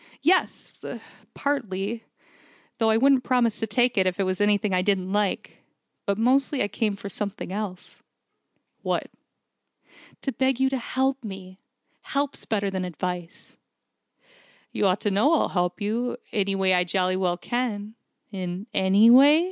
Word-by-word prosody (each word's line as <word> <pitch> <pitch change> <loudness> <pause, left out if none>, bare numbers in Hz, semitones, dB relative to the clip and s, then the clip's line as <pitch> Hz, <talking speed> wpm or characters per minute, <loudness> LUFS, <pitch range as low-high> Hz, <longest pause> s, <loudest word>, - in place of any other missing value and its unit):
"Yes, 370 +2 +1 0.6
partly. 225 -6 -2 0.7
Though 225 -1 +3
I 220 - +4
wouldn't 265 +1 +4
promise 245 -4 +1
to 225 - -2
take 240 +1 +2
it 185 - +3
if 185 +1 -2
it - - +3
was 185 +1 -1
anything 205 -1 +2
I 180 - +3
didn't 190 -1 0
like. 205 -2 -1 0.5
But 200 0 +1
mostly 260 +4 +2
I 205 - -2
came 210 0 -1
for 200 0 -8
something 200 -1 -5
else." 200 -3 -6 0.8
"What?" - - -2 1.1
"To 270 - -2
beg 265 -1 0
you 265 0 +3
to 270 - 0
help 265 +2 -1
me. 190 -2 -9 0.4
Help's 280 0 -3
better 200 -3 0
than 190 -1 -2
advice." 180 0 -6 1.2
"You 200 - +1
ought 185 +1 +1
to 205 - 0
know 240 +12 +3
I'll - - +1
help 180 -1 -1
you, 230 +4 -1
in - - -8
any 200 -1 0
way 190 -1 +3
I 180 0 +4
jolly 185 +1 0
well 180 -2 0
can 220 -1 -3 0.2
" - - -48
"In 185 0 -5
any 200 +5 +5
way?" 285 +5 +8
205 Hz, 160 wpm, -25 LUFS, 190-245 Hz, 1.2 s, way